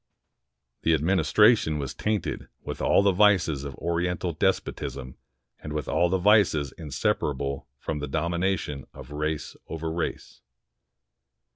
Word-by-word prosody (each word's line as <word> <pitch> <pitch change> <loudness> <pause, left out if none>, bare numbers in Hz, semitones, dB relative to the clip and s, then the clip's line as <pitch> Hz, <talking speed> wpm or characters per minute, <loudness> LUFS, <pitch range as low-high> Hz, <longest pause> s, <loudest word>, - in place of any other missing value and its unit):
The 80 - +3
administration 95 - +3
was 70 -3 -4
tainted 105 -1 -2 0.2
with - - -6
all - - +4
the 100 - +5
vices 90 -7 +3
of 70 -1 -6
Oriental 85 0 -1
despotism 70 -7 -2 0.4
and 75 - -7
with 75 -3 -3
all 85 - +2
the 95 - +2
vices 95 -8 +4
inseparable 70 -2 -2
from 75 +3 -4
the 75 - -4
domination 85 -2 -1
of - - -11
race 75 +1 -3
over 80 0 -4
race. 85 - -4
80 Hz, 125 wpm, -26 LUFS, 75-95 Hz, 0.4 s, the